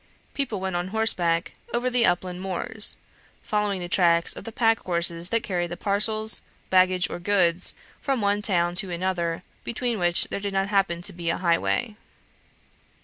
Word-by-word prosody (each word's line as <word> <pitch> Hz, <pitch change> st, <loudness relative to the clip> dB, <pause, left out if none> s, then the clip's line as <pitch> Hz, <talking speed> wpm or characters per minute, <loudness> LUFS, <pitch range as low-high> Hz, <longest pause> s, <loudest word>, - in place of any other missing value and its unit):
People 255 Hz, -8 st, -2 dB
went 190 Hz, -1 st, -3 dB
on 175 Hz, +1 st, -1 dB
horseback 180 Hz, -6 st, +1 dB, 0.2 s
over 240 Hz, +1 st, 0 dB
the 245 Hz, -2 st, +3 dB
upland 180 Hz, +1 st, -1 dB
moors, 195 Hz, +3 st, 0 dB, 0.5 s
following 210 Hz, -3 st, 0 dB
the 175 Hz, -, -4 dB
tracks 170 Hz, -1 st, +3 dB
of -, -, -9 dB
the 230 Hz, -, -6 dB
pack 225 Hz, -1 st, +2 dB
horses 170 Hz, -1 st, 0 dB
that 230 Hz, 0 st, +1 dB
carried 175 Hz, -4 st, -2 dB
the 175 Hz, -, -6 dB
parcels, 215 Hz, +2 st, +1 dB, 0.3 s
baggage, 185 Hz, 0 st, +4 dB
or -, -, -6 dB
goods 180 Hz, -2 st, +1 dB, 0.3 s
from 270 Hz, -3 st, 0 dB
one 205 Hz, 0 st, +1 dB
town 175 Hz, -4 st, +1 dB
to 180 Hz, +1 st, +1 dB
another, 175 Hz, -1 st, -2 dB, 0.2 s
between 235 Hz, -1 st, -2 dB
which 175 Hz, -1 st, +3 dB
there -, -, -3 dB
did 200 Hz, 0 st, -4 dB
not 195 Hz, +1 st, 0 dB
happen 195 Hz, -4 st, +1 dB
to -, -, -2 dB
be 170 Hz, -1 st, -4 dB
a 170 Hz, -, 0 dB
highway. 185 Hz, +5 st, 0 dB
185 Hz, 170 wpm, -25 LUFS, 175-210 Hz, 0.5 s, baggage